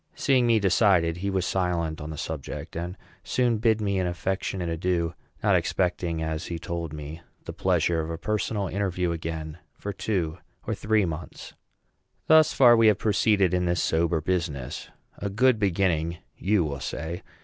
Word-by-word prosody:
Seeing 130 Hz, -4 st, +3 dB
me 115 Hz, -2 st, +4 dB
decided, 90 Hz, -4 st, +3 dB
he 100 Hz, +3 st, -2 dB
was 95 Hz, -2 st, 0 dB
silent 85 Hz, -4 st, -1 dB
on 75 Hz, -, -6 dB
the 80 Hz, -, -6 dB
subject, 80 Hz, -3 st, -6 dB
and 90 Hz, +3 st, -4 dB, 0.3 s
soon 120 Hz, +4 st, +1 dB
bade 110 Hz, -1 st, +3 dB
me 100 Hz, -2 st, 0 dB
an 90 Hz, -, 0 dB
affectionate 90 Hz, +1 st, -2 dB
adieu, 85 Hz, 0 st, -1 dB, 0.3 s
not -, -, +4 dB
expecting, 85 Hz, -3 st, 0 dB
as 80 Hz, +1 st, -3 dB
he 85 Hz, -, -4 dB
told 85 Hz, -1 st, -4 dB
me, 75 Hz, +2 st, -7 dB, 0.2 s
the -, -, -6 dB
pleasure 85 Hz, -2 st, +1 dB
of 80 Hz, -, -5 dB
a 80 Hz, -, -3 dB
personal 105 Hz, +2 st, -1 dB
interview 90 Hz, -2 st, -1 dB
again 80 Hz, -1 st, -5 dB, 0.2 s
for 100 Hz, -, -5 dB
two 90 Hz, -5 st, -2 dB, 0.3 s
or -, -, -1 dB
three 110 Hz, -1 st, +1 dB
months. 85 Hz, -2 st, -7 dB, 0.7 s
Thus 160 Hz, -1 st, +6 dB
far 120 Hz, -3 st, +7 dB
we 115 Hz, -1 st, +5 dB
have 105 Hz, -3 st, +5 dB
proceeded 100 Hz, -3 st, +2 dB
in 90 Hz, 0 st, +1 dB
this 85 Hz, -1 st, +1 dB
sober 80 Hz, 0 st, +1 dB
business. 80 Hz, -7 st, -3 dB, 0.3 s
A 100 Hz, -, -2 dB
good 120 Hz, +3 st, +3 dB
beginning, 85 Hz, -4 st, +1 dB, 0.2 s
you 100 Hz, -1 st, +2 dB
will 70 Hz, -3 st, -4 dB
say. 80 Hz, +6 st, -5 dB
90 Hz, 170 wpm, -26 LUFS, 80-100 Hz, 0.7 s, far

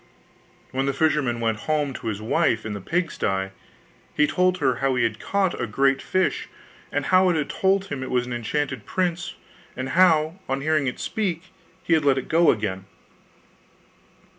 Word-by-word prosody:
When 135 Hz, +1 st, -1 dB
the 140 Hz, -, 0 dB
fisherman 145 Hz, -6 st, +1 dB
went 115 Hz, -2 st, 0 dB
home 150 Hz, -3 st, +1 dB
to -, -, -7 dB
his 110 Hz, -1 st, -3 dB
wife 110 Hz, 0 st, +1 dB
in 110 Hz, -, -3 dB
the 100 Hz, -, -6 dB
pigsty, 100 Hz, -, -1 dB, 0.7 s
he 150 Hz, -, +4 dB
told 180 Hz, +3 st, +2 dB
her 130 Hz, -7 st, +1 dB
how 135 Hz, 0 st, +1 dB
he 125 Hz, -, +2 dB
had 115 Hz, -1 st, -1 dB
caught 195 Hz, -3 st, 0 dB
a -, -, -1 dB
great 135 Hz, 0 st, +2 dB
fish, 185 Hz, 0 st, 0 dB, 0.4 s
and -, -, -1 dB
how 185 Hz, 0 st, +4 dB
it 175 Hz, -, +2 dB
had 150 Hz, -3 st, -1 dB
told 195 Hz, 0 st, +2 dB
him 145 Hz, -8 st, -5 dB
it 130 Hz, -, -5 dB
was 125 Hz, -1 st, +1 dB
an 125 Hz, -, -5 dB
enchanted 130 Hz, +1 st, -3 dB
prince, 180 Hz, -1 st, -1 dB, 0.4 s
and 130 Hz, +1 st, -3 dB
how, 165 Hz, 0 st, +3 dB
on 135 Hz, +1 st, -1 dB
hearing 155 Hz, -1 st, +1 dB
it 125 Hz, -, -3 dB
speak, 185 Hz, -4 st, -3 dB, 0.3 s
he 165 Hz, -, +1 dB
had 160 Hz, -2 st, +3 dB
let 140 Hz, -2 st, +3 dB
it 130 Hz, -, -4 dB
go 165 Hz, +1 st, +4 dB
again. 95 Hz, -3 st, -1 dB
140 Hz, 185 wpm, -24 LUFS, 125-170 Hz, 0.7 s, he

